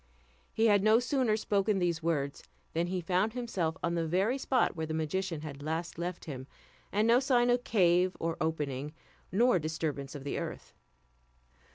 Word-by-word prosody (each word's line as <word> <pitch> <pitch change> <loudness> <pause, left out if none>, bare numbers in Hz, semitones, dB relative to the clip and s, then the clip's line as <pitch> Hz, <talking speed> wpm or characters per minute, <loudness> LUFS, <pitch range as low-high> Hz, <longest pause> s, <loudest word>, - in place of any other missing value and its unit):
He 220 - +1
had 205 -3 +5
no 215 +2 +5
sooner 250 -3 +1
spoken 205 -1 +1
these 175 -2 0
words, 145 -4 -1 0.3
than 170 +2 0
he 185 0 -2
found 185 +5 +1
himself 195 -10 -2
on 170 - 0
the 165 -1 0
very 195 - +1
spot 260 -6 +1
where 160 -1 -3
the 155 - -3
magician 165 +1 -2
had 145 -2 -7
last 165 +3 -3
left 175 +1 -4
him, 130 -4 -7 0.4
and 210 +2 +2
no 235 +2 +6
sign 245 -2 +3
of 245 0 +1
cave 180 -4 +3
or 165 0 -1
opening, 150 -3 -2 0.4
nor 230 0 +4
disturbance 155 -3 -3
of 140 - -7
the 145 - -2
earth. - - -6
175 Hz, 175 wpm, -31 LUFS, 160-215 Hz, 0.4 s, no